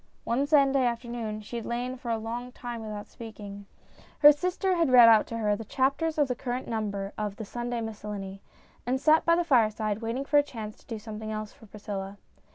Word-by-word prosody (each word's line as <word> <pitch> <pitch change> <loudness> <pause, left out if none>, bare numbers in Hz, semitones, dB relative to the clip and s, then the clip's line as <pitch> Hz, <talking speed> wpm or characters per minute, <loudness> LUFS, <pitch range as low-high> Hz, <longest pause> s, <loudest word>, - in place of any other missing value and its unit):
One 265 +5 0
Sunday 275 -3 +4
afternoon 235 -3 -3
she 225 +3 -6
had 230 - -5
lain 245 +2 -2
for 250 -2 -7
a 230 - +1
long 235 +3 -5
time 240 -2 -6
without 210 -1 -6
speaking. 205 -3 -10 0.5
Her 295 0 +9
sister 365 +5 0
had 335 -5 +2
read 245 -2 +9
out 220 -2 +6
to 230 - -5
her 210 -2 +1
the 225 - -6
chapters 280 +7 0
of 295 -2 +3
the 250 - 0
current 250 0 -4
number 205 -3 -3
of 210 -2 -2
The 220 - -7
Sunday 240 +2 -4
Miscellany 205 -3 -6 0.2
', - - -31
and 260 +2 +1
sat 310 +3 +4
by 335 - +5
the 350 - +1
fireside, 215 -7 +2
waiting 235 +4 -3
for 290 +1 +4
a - - +6
chance 220 -7 -8
to - - -24
do 225 - -4
something 215 0 -7
else 215 -1 -5
for 220 - -17
Priscilla. 200 -1 -6
230 Hz, 215 wpm, -28 LUFS, 215-260 Hz, 0.5 s, Her